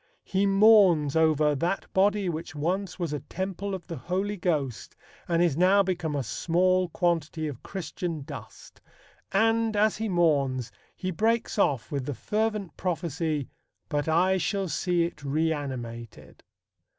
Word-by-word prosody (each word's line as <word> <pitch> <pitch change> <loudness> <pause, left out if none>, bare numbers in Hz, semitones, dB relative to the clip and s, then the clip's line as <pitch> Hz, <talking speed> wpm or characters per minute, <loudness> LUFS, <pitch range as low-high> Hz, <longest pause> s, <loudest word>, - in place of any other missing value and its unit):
He 195 +1 +1
mourns 195 -8 +5
over 155 -2 +3
"that 170 +7 -1
body, 200 +1 +2
which 165 -1 -4
once 180 +5 -2
was 170 -5 -3
a 150 - -2
Temple 190 +5 -4
of 185 - -9
the 165 -3 -6
Holy 195 +4 -2
Ghost, 150 - -2 0.3
and 170 0 +2
is 170 -6 +2
now 190 +4 +5
become 175 -5 -2
a 140 - -1
small 180 - +1
quantity 165 -2 -1
of 140 -5 -7
Christian 175 -4 -5
dust," - - -11 0.5
and, 225 +2 +2
as 215 +1 +3
he 220 0 -2
mourns, 140 - +1 0.2
he 185 - -3
breaks 220 +5 0
off 135 - +1
with 140 -3 -3
the 145 - -3
fervent 210 - -2
prophecy, 160 -5 -2 0.4
"But 145 -1 -1
I 185 +4 +3
shall 195 +1 -1
see 175 +1 +1
it 170 -3 -5
reanimated." 135 -7 -3
175 Hz, 145 wpm, -27 LUFS, 150-195 Hz, 0.5 s, mourns